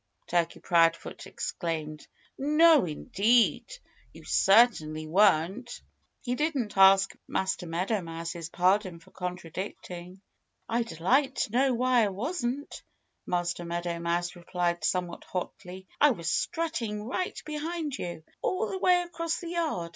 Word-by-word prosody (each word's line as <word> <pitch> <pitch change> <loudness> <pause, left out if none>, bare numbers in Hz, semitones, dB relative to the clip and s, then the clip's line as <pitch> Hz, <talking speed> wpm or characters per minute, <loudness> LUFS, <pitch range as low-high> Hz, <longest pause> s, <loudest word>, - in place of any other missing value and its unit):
Turkey 170 -1 0
Proudfoot 165 -1 +1
exclaimed. 155 -3 -4 0.3
"No, 300 - +5
indeed! 225 - +2 0.4
You - - -13
certainly 195 -8 +3
weren't." 195 +6 +2 0.4
He 245 - -1
didn't 275 -6 -1
ask 195 0 +6
Master 190 -2 -2
Meadow 185 +6 -1
Mouse's 165 0 -6
pardon 185 0 +1
for 165 - -20
contradicting. 180 0 -7 0.5
"I'd 230 -6 -2
like 265 - +2
to - - -1
know 255 +2 +2
why 250 -1 +3
I - - +1
wasn't," 255 - -3 0.5
Master 175 -1 -1
Meadow 170 0 -3
Mouse 175 +1 -1
replied 175 -1 -2
somewhat 180 +1 -1
hotly. 185 0 -6
"I 295 - +6
was 170 - -1
strutting 310 -12 -2
right 310 +11 -3
behind 305 -1 -3
you, 170 -2 -5 0.2
all 405 +5 -1
the 380 - -3
way 360 -1 +4
across 335 -1 -3
the 345 - -7
yard. 320 - -2
195 Hz, 125 wpm, -28 LUFS, 175-265 Hz, 0.5 s, ask